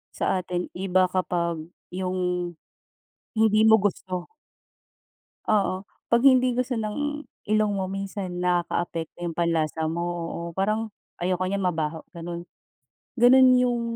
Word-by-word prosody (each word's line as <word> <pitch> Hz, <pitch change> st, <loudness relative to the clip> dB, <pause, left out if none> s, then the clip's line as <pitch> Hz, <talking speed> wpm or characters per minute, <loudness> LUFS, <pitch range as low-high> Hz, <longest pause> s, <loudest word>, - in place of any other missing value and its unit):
sa 185 Hz, -, +1 dB
atin 180 Hz, 0 st, -4 dB
iba 185 Hz, -1 st, +2 dB
kapag 170 Hz, -3 st, -1 dB, 0.3 s
yung, 180 Hz, -1 st, -2 dB, 0.8 s
hindi 215 Hz, -1 st, +4 dB
mo 220 Hz, 0 st, +8 dB
gusto. 185 Hz, +1 st, -3 dB, 1.2 s
Oo. 195 Hz, -2 st, +1 dB, 0.2 s
'Pag 235 Hz, 0 st, +4 dB
hindi 255 Hz, -1 st, +6 dB
gusto 250 Hz, +1 st, -1 dB
ng 290 Hz, +7 st, -2 dB, 0.3 s
ilong 215 Hz, -1 st, +2 dB
mo 190 Hz, -, -1 dB
minsan 195 Hz, -2 st, -4 dB
nakakaapekto 175 Hz, -1 st, -1 dB
yung 170 Hz, -, -2 dB
panlasa 160 Hz, -2 st, 0 dB
mo, 170 Hz, +2 st, -2 dB
oo. 170 Hz, -1 st, -4 dB
Parang 215 Hz, +4 st, 0 dB, 0.3 s
ayoko 185 Hz, +1 st, 0 dB
niyan 200 Hz, 0 st, -1 dB
mabaho, 160 Hz, -2 st, -1 dB
ganun. 170 Hz, 0 st, -6 dB, 0.7 s
Ganun 255 Hz, +2 st, +7 dB
yung 245 Hz, -1 st, +2 dB
185 Hz, 120 wpm, -25 LUFS, 175-215 Hz, 1.2 s, mo